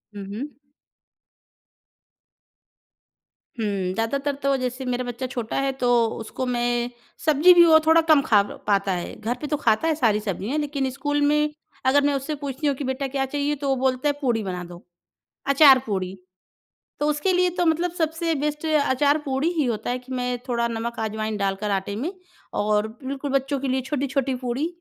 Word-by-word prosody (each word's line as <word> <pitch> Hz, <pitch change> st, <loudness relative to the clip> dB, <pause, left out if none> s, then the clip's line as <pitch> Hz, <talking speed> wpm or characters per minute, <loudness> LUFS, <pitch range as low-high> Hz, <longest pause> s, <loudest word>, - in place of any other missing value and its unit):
हुँ, 200 Hz, -1 st, -6 dB
हुँ। 280 Hz, +4 st, -7 dB, 3.0 s
हुँ, 225 Hz, -, -2 dB, 0.3 s
ज़्यादातर 275 Hz, +6 st, -1 dB
तो 275 Hz, 0 st, +3 dB
जैसे 255 Hz, +1 st, -4 dB
मेरा 250 Hz, 0 st, -1 dB
बच्चा 245 Hz, +1 st, -4 dB
छोटा 240 Hz, -3 st, -4 dB
है 275 Hz, 0 st, 0 dB
तो -, -, +3 dB, 0.3 s
उसको 225 Hz, +3 st, -5 dB
मैं 240 Hz, 0 st, 0 dB, 0.4 s
सब्ज़ी 310 Hz, +4 st, +6 dB
भी 345 Hz, -1 st, +7 dB
वो 315 Hz, -1 st, +7 dB
थोड़ा 325 Hz, +1 st, +6 dB
कम 290 Hz, -2 st, +6 dB
खा 210 Hz, -6 st, +4 dB
प -, -, -10 dB
पाता 200 Hz, -1 st, +2 dB
है, 175 Hz, -1 st, -4 dB
घर 235 Hz, +3 st, -1 dB
पे 300 Hz, -, -3 dB
तो 295 Hz, 0 st, -1 dB
खाता 230 Hz, +4 st, +2 dB
है 315 Hz, -, +2 dB
सारी 220 Hz, -7 st, +2 dB
सब्जियाँ 210 Hz, -, -3 dB
लेकिन 280 Hz, -3 st, -1 dB
स्कूल 290 Hz, +2 st, -2 dB
में 300 Hz, +1 st, +3 dB, 0.4 s
अगर 280 Hz, +2 st, +5 dB
मैं 290 Hz, -, +2 dB
उससे 280 Hz, +3 st, -2 dB
पूछती 285 Hz, +1 st, -4 dB
हूँ 280 Hz, -, +2 dB
कि 280 Hz, -, -5 dB
बेटा 265 Hz, +1 st, -2 dB
क्या 270 Hz, 0 st, -1 dB
चाहिए? 290 Hz, +2 st, -1 dB
तो 280 Hz, 0 st, -3 dB
वो 270 Hz, -, +3 dB
बोलता 260 Hz, +2 st, +1 dB
है -, -, +1 dB
पूड़ी 235 Hz, -5 st, +1 dB
बना 180 Hz, -2 st, -4 dB
दो। 175 Hz, 0 st, -12 dB, 0.6 s
अचार 275 Hz, -2 st, +7 dB
पूड़ी, 190 Hz, -3 st, -3 dB, 0.9 s
तो 295 Hz, -, +1 dB
उसके 300 Hz, +6 st, 0 dB
लिए 360 Hz, 0 st, +3 dB
तो 350 Hz, -, +1 dB
मतलब 330 Hz, +2 st, +2 dB
सबसे 325 Hz, +1 st, 0 dB
बेस्ट 300 Hz, +2 st, -2 dB
अचार 290 Hz, -1 st, +2 dB
पूड़ी 275 Hz, +4 st, 0 dB
ही 300 Hz, -, +2 dB
होता 230 Hz, -1 st, -2 dB
है, 250 Hz, -, -1 dB
कि 255 Hz, +1 st, -11 dB
मैं 250 Hz, -1 st, -2 dB
थोड़ा 235 Hz, -1 st, 0 dB
नमक 235 Hz, +1 st, -4 dB
अजवाइन 220 Hz, 0 st, -2 dB
डालकर 200 Hz, +1 st, -1 dB
आटे 195 Hz, +1 st, -2 dB
में 310 Hz, -, -3 dB, 0.5 s
और 210 Hz, +1 st, +1 dB, 0.2 s
बिल्कुल 275 Hz, +1 st, -4 dB
बच्चों 275 Hz, +1 st, 0 dB
के 275 Hz, -, -2 dB
लिए 260 Hz, +1 st, +1 dB
छोटी-छोटी 275 Hz, -1 st, -1 dB
पूड़ी 250 Hz, +4 st, -2 dB
265 Hz, 185 wpm, -24 LUFS, 235-290 Hz, 3.0 s, भी